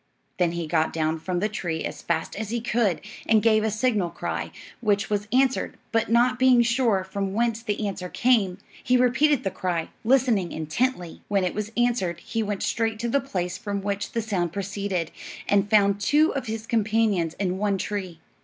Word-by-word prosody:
Then 175 -2 +2
he 170 -1 -3
got 160 0 +1
down 160 0 -1
from 180 +2 -2
the 210 - +2
tree 175 -6 -3
as - - -5
fast 165 -1 -2
as 215 0 -4
he 235 +1 -1
could 225 -5 0 0.3
and 220 - +5
gave 215 -1 +4
a 220 - +1
signal 215 -4 +1
cry, - - -4 0.3
which 210 -2 0
was 205 0 0
answered; 260 +1 +1
but 225 0 +1
not 245 +2 +3
being 255 -2 +6
sure 235 -5 +2
from 195 0 -3
whence 230 0 +1
the 215 -2 -2
answer 180 -2 -5
came, 215 -7 +2 0.3
he 250 +1 +3
repeated 250 +3 +3
the 195 - -1
cry, 175 -3 -2
listening 235 -7 +2
intently. 175 +4 -2
When 200 -2 +1
it 180 - -1
was 210 +1 -4
answered 235 -9 +1
he 225 - -3
went 205 -2 -2
straight 225 -1 0
to 235 +2 -2
the 280 +4 +2
place 180 -9 -3
from 200 -2 -3
which 200 0 -3
the 230 - -1
sound 185 -6 -1
proceeded, 195 -3 -3 0.4
and 205 0 +2
found 200 -1 +4
two 300 +9 +3
of 270 -3 -3
his 220 0 -4
companions 215 -7 +1
in 185 -1 -2
one 205 -1 +1
tree. 190 -4 -4
210 Hz, 190 wpm, -25 LUFS, 185-235 Hz, 0.4 s, being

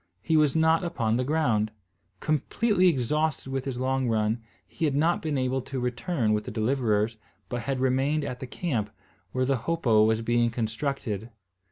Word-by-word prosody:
He 160 - +1
was 150 -2 +4
not 160 +1 +3
upon 115 -11 0
the 130 - +1
ground. 125 -7 +1 0.5
Completely 185 - +2
exhausted 150 -1 0
with 135 0 -2
his 135 -3 -3
long 130 0 0
run, 110 +1 +1 0.3
he 165 - -2
had 145 -3 +1
not 160 +4 +2
been 155 -3 -1
able 130 0 0
to 130 +1 -5
return 125 -1 0
with 105 0 -1
the - - -5
deliverers, 110 -1 0 0.3
but 120 - -2
had 135 0 -2
remained 135 +4 +1
at 125 - -4
the 130 - -6
camp, 125 - -2 0.4
where 130 0 0
the 135 0 +1
hopo 120 -5 +2
was 110 +1 +2
being 120 0 +2
constructed. 115 -1 -3
130 Hz, 175 wpm, -27 LUFS, 115-150 Hz, 0.5 s, was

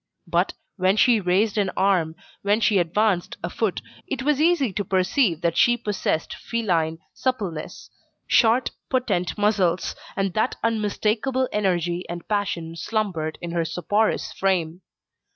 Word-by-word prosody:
But, - - 0 0.2
when 190 +2 +2
she 235 0 +5
raised 200 +3 +1
an 200 -2 +1
arm, 180 -5 +2 0.3
when 205 +2 +2
she 210 -3 +3
advanced 180 +2 +1
a 170 - -3
foot, 220 -5 -1 0.3
it 265 -1 -3
was 295 0 +2
easy 315 - +3
to 205 - -1
perceive 185 - +1
that 170 -1 +1
she 240 0 +4
possessed 205 -7 -2
feline 170 -9 -1 0.2
suppleness, 200 -12 -3 0.3
short, 235 +1 +3 0.2
potent 200 -10 0
muscles, 200 -4 +1 0.2
and 195 -2 -1
that 220 +4 0
unmistakable 230 +4 0
energy 180 -3 0
and 175 0 -6
passion 190 -6 -2
slumbered 170 -4 -2
in 170 - -4
her 170 -1 0
soporous 205 +6 0
frame. 180 -3 0
200 Hz, 135 wpm, -24 LUFS, 175-220 Hz, 0.3 s, she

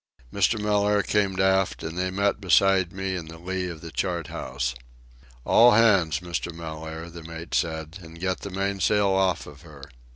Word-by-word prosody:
Mr. 100 +3 +2
Mellaire 105 -1 +2
came 100 -2 0
aft, 95 0 +2
and 80 +1 -5
they 90 +1 -1
met 100 +2 0
beside 95 -1 +3
me 95 0 -3
in 85 -3 -6
the 80 +1 -10
lee 90 +2 -3
of 80 -2 -8
the 85 - -8
chart 85 -3 -2
house. 65 +1 -3 0.7
"All 120 +1 +6
hands, 95 -9 +4
Mr. 85 0 -4
Mellaire," 80 0 -7
the 85 0 -9
mate 80 +1 -9
said, 80 +2 -2
"and 85 0 -12
get 95 +1 -1
the 100 - -7
mainsail 100 +1 +1
off 95 -1 +1
of 75 -1 -13
her. 75 -5 -14
90 Hz, 175 wpm, -25 LUFS, 80-100 Hz, 0.7 s, All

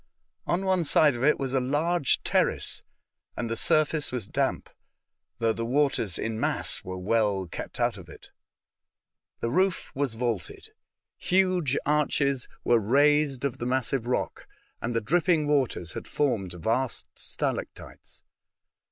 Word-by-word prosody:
On 180 +3 0
one 185 -2 +2
side 150 -1 +4
of 120 - -4
it 150 +2 +4
was 135 -1 -3
a 135 - +3
large 145 +4 +1
terrace, - - 0 0.6
and 120 - -2
the - - 0
surface 155 +4 +1
was 120 -6 -3
damp, - - -1 0.7
though 115 -1 +1
the 115 - -4
waters 125 -6 +1
in 110 -1 -3
mass - - 0
were 95 0 -6
well 100 0 +1
kept 85 - -7
out - - +1
of - - -13
it. - - -14 1.1
The 115 - -1
roof 185 +4 +1
was 135 -4 -1
vaulted. 115 -6 -3 0.5
Huge 180 -7 +2
arches 140 -3 +1 0.2
were 120 -1 +4
raised 140 +4 +3
of 135 - -2
the 120 - -2
massive 125 -1 0
rock, 125 - -2 0.3
and 115 0 -2
the 115 - +1
dripping 165 - +2
waters 130 - 0
had - - -7
formed 110 -11 -1
vast 115 +9 -1
stalactites. - - -5
130 Hz, 145 wpm, -27 LUFS, 115-150 Hz, 1.1 s, side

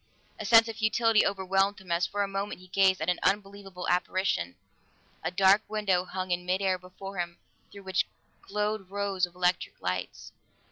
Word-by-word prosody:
A - - -5
sense 225 0 +7
of 225 -1 -6
futility 220 0 +3
overwhelmed 195 +1 +1
him 185 -2 -10
as 170 +1 +2
for 205 0 -1
a - - -1
moment 195 0 -4
he 185 0 -16
gazed 190 0 +3
at - - 0
an 180 - +1
unbelievable 195 -2 -2
apparition 180 - 0 0.7
a - - 0
dark 190 +2 +5
window 195 -4 +1
hung 185 0 -4
in 175 0 0
midair 185 +1 0
before 185 +1 -9
him 170 -1 -3 0.3
through 200 0 -11
which 190 0 0 0.3
glowed 210 -1 -2
rows 195 -2 0
of 175 - -22
electric 180 0 0
lights. 90 0 -4
190 Hz, 175 wpm, -28 LUFS, 180-200 Hz, 0.7 s, sense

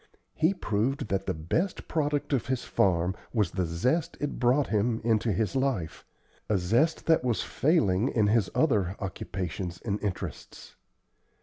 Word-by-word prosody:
He 165 +5 +2
proved 125 - -1
that 95 0 -1
the - - +1
best 160 - -2
product 145 -2 -1
of 130 - 0
his 130 -2 -1
farm 90 0 +1 0.2
was 105 -6 +2
the 90 -1 -1
zest 130 - 0
it 145 - -3
brought 130 +3 +3
him 110 +2 +1
into 115 0 +2
his 110 +6 -1
life 130 -12 -1 0.4
a 105 - +3
zest 115 - +1
that 160 -5 +3
was 120 -3 0
failing 120 - +2
in 110 -3 +2
his 105 -1 +2
other 105 - +2
occupations 90 -2 -4
and 105 -2 -1
interests. 100 -4 -6
110 Hz, 150 wpm, -28 LUFS, 95-135 Hz, 0.4 s, brought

